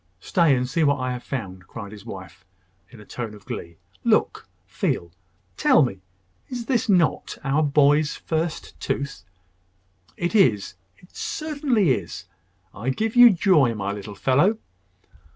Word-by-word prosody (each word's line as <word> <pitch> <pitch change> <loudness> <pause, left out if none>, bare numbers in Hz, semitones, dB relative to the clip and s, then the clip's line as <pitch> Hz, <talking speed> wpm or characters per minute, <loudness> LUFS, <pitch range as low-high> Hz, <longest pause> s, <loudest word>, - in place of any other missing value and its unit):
Stay, 160 - +3
and 125 0 -1
see 160 +6 0
what 140 -2 +2
I 130 0 -2
have 125 -1 -4
found!" 95 -10 -6
cried 100 -3 -8
his 110 +1 -12
wife, 95 -6 -10 0.5
in 120 - -15
a 105 - -13
tone 115 -2 -6
of 105 - -16
glee. 85 -1 -7 0.3
"Look! - - +1 0.2
Feel! 85 -1 -2 0.5
Tell 155 - +5
me 100 -7 -3 0.5
is 245 -2 -5 0.2
not 180 -5 +3
this - - -8
our 140 +2 +1
boy's 145 0 +3
first 160 0 -4
tooth?" 140 -1 -3 0.9
"It 175 +3 -2
is 120 - +3 0.2
it 180 - -22
certainly 285 - 0
is. 95 -9 -3 0.5
I 115 +6 -4
give 220 - -1
you 245 0 +10
joy, 165 - +3
my 100 -1 -3
little 100 0 -7
fellow!" 150 - +2
135 Hz, 150 wpm, -23 LUFS, 105-175 Hz, 0.9 s, you